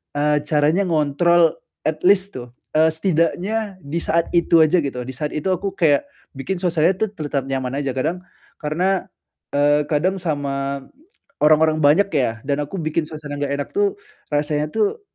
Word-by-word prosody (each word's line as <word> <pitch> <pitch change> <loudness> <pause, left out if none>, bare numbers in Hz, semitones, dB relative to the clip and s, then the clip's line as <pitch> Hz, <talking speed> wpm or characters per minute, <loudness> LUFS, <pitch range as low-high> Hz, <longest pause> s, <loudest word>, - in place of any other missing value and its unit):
eee, 150 +1 +2
caranya 155 +5 +2
ngontrol 165 +2 +3 0.3
at 155 0 -2
least 195 -1 +3
tuh, 120 -1 -9 0.3
eee, 160 +1 +5
setidaknya 185 +4 -1
di 145 +4 -4
saat 165 +1 +1
itu 170 -1 +4
aja 155 +4 +3
gitu, 130 -3 -4
di - - -4
saat 150 +2 -3
itu 150 +5 -3
aku 190 +1 -1
kayak 160 - +3 0.3
bikin 185 +7 -3
suasana, 170 -1 +2
tuh, 220 -1 0
tetap 145 -5 -3
nyaman 135 +1 -2
aja, 140 - -2
kadang 165 +7 -1 0.4
karena, 180 +5 0 0.5
eee, 145 +1 +3
kadang 180 +6 +1
sama 140 -3 -2 0.6
orang-orang 155 +1 +4
banyak 180 +8 +4
ya, 125 -6 +1
dan 145 +1 0
aku 190 +7 -7
bikin 155 +1 0
suasana 150 -2 -7
enggak 140 0 -1
enak, 145 - -4
tuh. 205 0 +2 0.4
Rasanya, 150 +1 0
tuh, 220 - 0
155 Hz, 160 wpm, -21 LUFS, 145-180 Hz, 0.6 s, eee